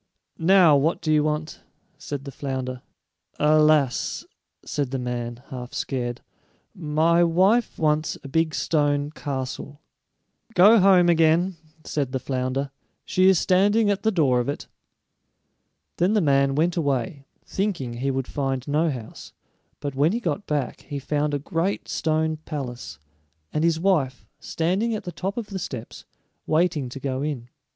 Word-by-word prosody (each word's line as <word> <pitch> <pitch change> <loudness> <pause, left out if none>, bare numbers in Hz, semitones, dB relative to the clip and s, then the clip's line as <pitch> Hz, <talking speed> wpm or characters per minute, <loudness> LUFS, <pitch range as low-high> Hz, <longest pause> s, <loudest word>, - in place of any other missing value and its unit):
"Now, 175 -2 +6
what 155 +5 +1
do 155 - 0
you 150 -1 +4
want?" 155 +1 -3 0.4
said 145 -1 -6
the 140 - -6
flounder. 130 -2 -4 0.6
"Alas," 150 -3 +3 0.4
said 145 -3 -2
the 135 - -2
man, 120 -1 -4
half 125 -1 -7
scared, 120 -3 -3 0.5
"my 165 +1 +2
wife 190 +8 +2
wants 155 0 +1
a - - -7
big 160 +3 0
stone 145 -2 +1
castle." 140 -1 -5 0.8
"Go 210 +5 +7
home 185 -2 +5
again," 170 +2 +3 0.3
said 140 -4 -2
the 130 - 0
flounder; 130 +1 -2 0.3
"she 185 +1 +4
is 190 - +5
standing 205 +5 +3
at 200 - -1
the 220 - +2
door 145 - +2
of 120 - -1
it." 145 - -4 1.3
Then 180 +5 +2
the 215 - +4
man 140 -4 +2
went 165 +4 +1
away, 140 -3 -2 0.2
thinking 185 - -2
he 135 +3 -1
would 135 -1 -2
find 135 -2 -2
no 155 +3 +2
house, 120 -6 -8 0.5
but 140 -1 -4
when 145 +7 +2
he 235 - 0
got 190 -1 -3
back 145 -5 -2
he 145 - -6
found 145 +1 -1
a - - +1
great 165 +6 -2
stone 160 0 0
palace, 140 -6 -6 0.6
and 155 - 0
his 165 -1 +2
wife 145 - +1
standing 190 +8 -1
at 215 - -5
the 175 - -5
top 195 +4 -4
of 230 -3 -4
the 190 - -3
steps, 125 -9 -7 0.4
waiting 155 -4 +1
to 135 - -8
go 135 -1 -3
in. 140 -5 -4
150 Hz, 155 wpm, -24 LUFS, 135-170 Hz, 1.3 s, Go